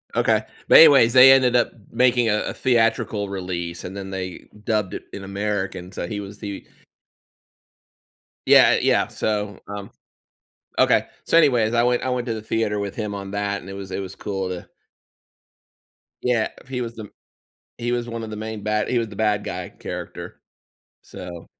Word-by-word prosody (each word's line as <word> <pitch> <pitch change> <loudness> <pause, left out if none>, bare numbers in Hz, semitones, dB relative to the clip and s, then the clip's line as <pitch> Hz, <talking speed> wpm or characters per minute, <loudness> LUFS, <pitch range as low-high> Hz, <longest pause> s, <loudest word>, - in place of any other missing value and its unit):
Okay. - - +2 0.2
But, - - +8
anyways, 140 -7 +8
they 130 +1 +9
ended 125 -2 +4
up 120 - +3 0.2
making 125 -2 +3
a 105 - +3
a - - -4
theatrical 115 -4 +1
release, 90 -3 -5
and 95 +2 -7
then 95 -1 -6
they 95 -1 -6 0.2
dubbed 105 -4 0
it - - -7
in 95 - -7
American, 100 -2 -3
so, 85 - -5
he 105 +1 -4
was 100 0 -9
the 100 -2 -7 1.8
Yeah, - - +7
eh - - 0
yeah, - - +3
so, 105 -2 -3
um 100 -1 -7 0.9
okay. - - +4 0.2
So, - - +2
anyways, 120 -8 +3
I 120 - +4
went 125 0 +1
I 130 - -1
went 125 0 -2
to 115 - -2
the 110 - -6
theater 110 -1 -1
with 100 -1 -4
him 105 -2 -4
on 100 -1 -6
that, 100 -1 -2
and 95 - -10
it - - -6
was 95 -1 -8
it 95 - -3
was 95 -1 -7
cool 95 -2 -4
to 90 -1 -7 1.5
Yeah, 120 -3 +1 0.2
he 125 -1 -3
was 115 -1 -5
the 110 - -7
m 105 - -12 0.7
he 120 0 -2
was 120 -1 -2
one 115 -1 -5
of 110 - -6
the 105 - -6
main 110 -1 -6
bad 105 0 0
he 125 - +1
was 115 -1 -2
the 100 - -11
bad 105 -2 +1
guy 90 0 -5
character. - - -8 0.6
So, 85 -2 -9
105 Hz, 185 wpm, -22 LUFS, 95-120 Hz, 1.8 s, they